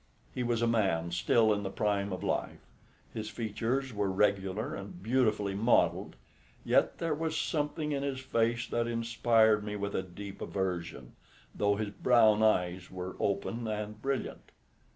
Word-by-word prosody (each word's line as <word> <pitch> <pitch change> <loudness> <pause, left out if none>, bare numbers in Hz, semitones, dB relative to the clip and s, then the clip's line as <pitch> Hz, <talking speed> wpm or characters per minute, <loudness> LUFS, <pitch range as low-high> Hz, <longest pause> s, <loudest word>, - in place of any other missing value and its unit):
He - - -3
was 120 -1 0
a - - +3
man 95 -7 +1
still 110 +5 +3
in 105 - -2
the 100 - -3
prime 100 0 -1
of 90 - -4
life. - - -2 0.5
His 110 -1 -4
features 120 +4 -2
were 105 -1 0
regular 95 +1 0
and 100 -2 -8
beautifully 110 -4 +1
modelled; 110 - +2 0.5
yet - - +3
there 165 -2 -1
was 160 +1 -2
something 150 0 -1
in 140 -1 -1
his 140 -2 -2
face 115 -2 0
that 120 0 0
inspired 115 -2 +3
me 105 0 -4
with 100 0 -3
a - - 0
deep 95 +2 -9
aversion, 90 -3 -3 0.4
though 100 0 +1
his 105 0 -3
brown 110 -2 +4
eyes 90 -4 +1
were 95 0 -6
open 110 +4 -1
and 105 0 -4
brilliant. 135 +1 -3
110 Hz, 155 wpm, -31 LUFS, 100-120 Hz, 0.5 s, brown